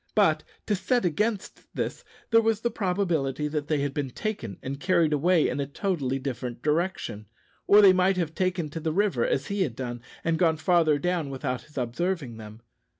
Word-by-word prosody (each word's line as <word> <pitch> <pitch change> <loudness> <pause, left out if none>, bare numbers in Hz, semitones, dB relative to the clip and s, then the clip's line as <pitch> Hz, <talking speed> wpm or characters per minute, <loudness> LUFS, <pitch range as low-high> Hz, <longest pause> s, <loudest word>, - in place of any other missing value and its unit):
But, - - +3 0.2
to 210 - 0
set 240 +3 +1
against 205 +5 -2
this, - - -3 0.3
there 230 0 +6
was 225 -1 +1
the 235 - 0
probability 175 - 0
that 150 -1 -3
they 150 -3 +1
had 140 -1 -1
been 140 -2 -2
taken 125 - -4
and 135 +1 -4
carried 165 -3 +2
away 165 +3 +3
in - - -2
a 140 - -1
totally 140 -5 -1
different 125 -2 -5
direction; 150 - -1 0.4
or 205 +1 +8
they 190 -2 +8
might 185 +1 +3
have 165 -3 -1
taken 185 -3 -1
to 165 - -5
the 160 0 -1
river, 190 - +1
as 135 - 0
he 200 0 -2
had 135 -11 0
done, 120 -2 -5 0.2
and 165 -1 0
gone 165 -3 +3
farther 160 -2 +3
down 170 -1 -1
without 130 -1 -3
his 150 -1 -18
observing 130 +1 -2
them. 110 +1 -11
160 Hz, 195 wpm, -27 LUFS, 135-185 Hz, 0.4 s, or